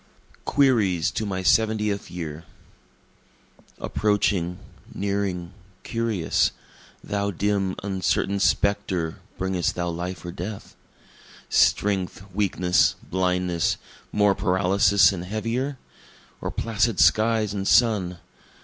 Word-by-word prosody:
Queries 105 - +2
to 110 -2 -3
My 95 -1 -3
Seventieth 105 +1 +1
Year 80 -2 -6 1.3
Approaching, 100 -4 0 0.3
nearing, 100 -3 -2 0.3
curious, 115 -7 0 0.5
Thou 100 0 -1
dim, 100 0 0
uncertain 95 0 0
spectre 95 -5 0 0.2
bringest 95 -2 -1
thou 85 0 -2
life 90 +2 -5
or 85 - -4
death? 95 +4 -7 0.7
Strength, 95 -1 +1
weakness, 90 -3 +2 0.2
blindness, 90 -2 0 0.3
more 105 -1 +3
paralysis 95 -1 +3
and 90 -3 -5
heavier? 115 +8 -2 0.6
Or - - -3
placid 115 -1 0
skies 110 -2 +3
and 100 -1 -3
sun? 105 -7 +3
100 Hz, 95 wpm, -24 LUFS, 90-105 Hz, 1.3 s, more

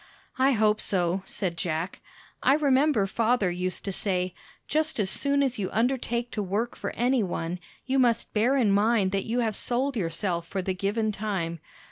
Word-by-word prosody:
"I 270 +1 +4
hope 215 -1 +2
so," 180 -1 +1
said 180 -4 -3
Jack. 165 +1 -3 0.4
"I 275 - +5
remember 280 -6 +3
father 220 -1 +1
used 180 +1 -3
to 200 - -2
say: 185 -2 -1 0.3
Just 310 -2 0
as 195 -2 +2
soon 280 0 +2
as 255 -4 -1
you 190 - -1
undertake 240 0 0
to 210 - -2
work 205 +5 -2
for - - -4
any 245 +1 +2
one, 175 -2 -3 0.3
you 265 +1 +1
must 235 -3 +2
bear 240 +6 +3
in 225 -6 +3
mind 205 -1 +3
that 195 0 -1
you 240 +2 0
have 220 -3 0
sold 255 +5 -1
yourself 170 -2 -2
for 190 +1 -3
the 190 - -1
given 210 +4 -1
time. 190 -5 -3
210 Hz, 180 wpm, -27 LUFS, 185-245 Hz, 0.4 s, I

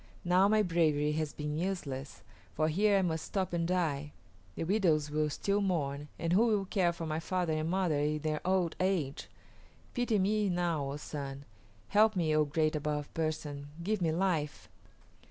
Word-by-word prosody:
Now 180 +2 +5
my 215 +1 +4
bravery 155 -4 +2
has 155 -1 -1
been 150 +1 -4
useless, 150 -8 -4 0.3
for 155 +1 +2
here 200 +5 +3
I - - +3
must 160 -3 -1
stop 190 -3 -2
and 170 -1 0
die. 150 -5 -1 0.4
The - - -3
widows 165 -6 +2
will 155 0 +1
still 200 +7 0
mourn, 145 -7 -1
and 165 0 -1
who 225 +6 +5
will 210 -3 +1
care 185 -2 +2
for 170 -1 -6
my 155 0 -2
father 175 -1 -1
and 155 +1 -1
mother 180 -5 +1
in 150 +1 +1
their 155 0 -2
old 185 -2 +1
age? 180 -7 -1 0.6
Pity 245 -3 +1
me 205 +1 +2
now, 170 -6 0
O - - -4
Sun; 140 -2 -6 0.4
help 215 +1 +4
me, 160 -4 +1
O 155 0 +4
Great 155 +1 +1
Above 150 -1 -2
Person! 150 -3 -3 0.2
Give 210 +1 0
me 165 -2 +2
life!" 155 - -1
165 Hz, 175 wpm, -32 LUFS, 150-185 Hz, 0.6 s, Now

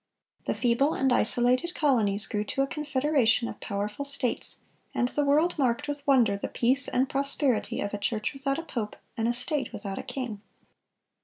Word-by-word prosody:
The - - -1
feeble 250 +5 +1
and 265 -1 +1
isolated 250 +9 +3
colonies 220 -8 +1
grew 210 -1 -2
to 270 +6 -1
a - - +1
confederation 275 -5 0
of - - -8
powerful 205 +6 -4
States, 280 -3 +2 0.3
and 245 - 0
the 295 - -1
world 305 +4 +1
marked 260 +2 0
with 290 -1 -5
wonder 240 -7 +4
the 200 - -5
peace 260 +3 +3
and 260 +2 0
prosperity 275 -3 +1
of 200 - -4
"a 205 - -3
church 215 +4 -2
without 275 0 -2
a 330 - -5
pope, 230 -9 -5 0.2
and 225 0 -1
a 240 - +1
state 255 +2 -1
without 205 -3 -6
a - - -3
king." 250 -5 -6
255 Hz, 180 wpm, -27 LUFS, 225-280 Hz, 0.3 s, wonder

